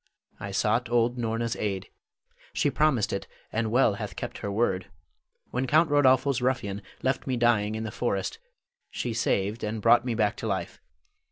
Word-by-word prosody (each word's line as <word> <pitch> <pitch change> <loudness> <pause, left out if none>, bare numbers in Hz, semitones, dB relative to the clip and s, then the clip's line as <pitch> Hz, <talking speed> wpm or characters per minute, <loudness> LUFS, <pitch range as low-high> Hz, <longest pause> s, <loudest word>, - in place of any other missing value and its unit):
I - - -5
sought 120 0 +1
old 120 +1 +2
Norna's 115 0 -1
aid. 100 -3 -3 0.6
She 145 - +1
promised 135 -5 +2
it, 100 - -3 0.3
and 110 0 0
well 120 -1 +4
hath 100 - -6
kept - - -5
her 100 - -3
word. 95 -4 0 0.6
When 130 +2 -1
Count 155 +3 +4
Rodolpho's 135 -2 +4
ruffian 105 -6 -1 0.2
left 130 +1 0
me 130 -2 0
dying 110 -3 +2
in 110 - -3
the 110 - -4
forest, 105 - -2 0.5
she 120 - -3
saved, 110 -1 0
and 110 +1 -2
brought 115 +2 +5
me 125 -2 -2
back 105 -2 +1
to 115 - -4
life. 95 -4 -3
115 Hz, 170 wpm, -27 LUFS, 105-125 Hz, 0.6 s, brought